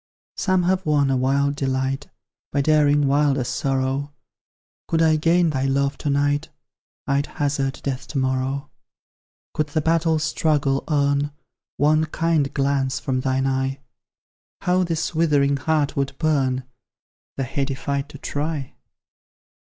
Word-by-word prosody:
Some 185 -2 +1
have 185 +1 +1
won 145 -4 +2
a - - +2
wild 140 +2 +1
delight, 135 0 -1 0.4
By 140 - +1
daring 145 -1 +3
wilder 140 -1 +2
sorrow; 135 +3 -1 0.8
Could 165 - +1
I 160 -1 +4
gain 165 +2 +3
thy 135 -2 -1
love 140 +1 +1
to 145 - -2
night, 145 +2 +1 0.6
I'd 140 +1 0
hazard 140 -2 -2
death 135 -1 -3
to 150 - -5
morrow. 130 +2 -1 0.8
Could 155 - 0
the 145 +2 -1
battle 165 0 +2
struggle 150 -3 +1
earn 145 -1 +1 0.5
One 155 +2 +3
kind 155 -2 0
glance 135 -1 0
from 130 -1 -1
thine 130 0 0
eye, 135 0 -1 0.8
How 180 +1 +2
this 170 -2 -2
withering 145 -4 +2
heart 150 +1 0
would 140 -1 -2
burn, 135 -5 +1 0.7
The 135 - 0
heady 135 +1 -2
fight 140 +1 -3
to 145 - -10
try! 145 -1 -3
140 Hz, 135 wpm, -22 LUFS, 135-155 Hz, 0.8 s, I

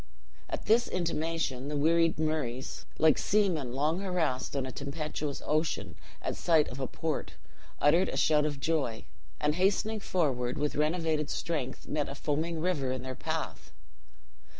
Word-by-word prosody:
At - - -4
this 230 +3 +4
intimation, 165 -6 -1
the 150 0 -2
wearied 165 +2 +3
Murrays 150 -5 -2
like 155 -2 +5
seamen 180 -11 +2
long 150 +6 +1
harassed 170 -10 -1
on 135 -2 0
a 130 - -5
tempestuous 145 +1 -4
ocean 155 +1 0 0.3
at - - -1
sight 160 -3 +4
of 125 - -7
a 130 - -1
port 160 +3 -3 0.5
uttered 165 +6 +4
a - - -3
shout 150 -1 +4
of 145 -2 -4
joy; 135 -7 0 0.3
and 150 0 +2
hastening 200 +5 +2
forward 130 -11 0
with 150 0 0
renovated 155 0 +1
strength, 145 -6 -3
met 150 -1 -1
a 140 - -5
foaming 160 +3 -1
river 155 -6 0
in 130 -1 -3
their 130 0 -4
path. - - -4
150 Hz, 150 wpm, -30 LUFS, 140-165 Hz, 0.5 s, like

